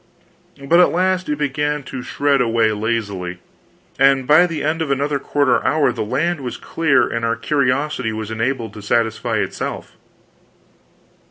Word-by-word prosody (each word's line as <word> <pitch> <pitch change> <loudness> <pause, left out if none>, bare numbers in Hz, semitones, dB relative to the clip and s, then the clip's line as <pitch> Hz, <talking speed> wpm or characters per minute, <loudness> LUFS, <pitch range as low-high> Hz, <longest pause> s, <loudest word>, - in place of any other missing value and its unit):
But 170 +5 +4
at 180 - +6
last 185 0 0
it 150 - -1
began 150 0 -1
to 130 -1 -7
shred 140 +1 +1
away 115 -2 +2
lazily, 105 -5 -3 0.6
and 135 -1 +4
by 155 +6 +5
the 165 -3 -4
end 155 +2 -1
of 160 - -2
another 140 +1 0
quarter 140 -2 +1
hour 145 -4 +2
the 115 -2 -3
land 145 +8 -1
was 125 -2 -5
clear 165 -4 +1
and 115 0 -3
our 115 0 +1
curiosity 130 -1 0
was 110 0 -5
enabled 115 -1 -2
to 105 - -9
satisfy 110 +2 0
itself. - - -4
135 Hz, 155 wpm, -19 LUFS, 115-150 Hz, 0.6 s, at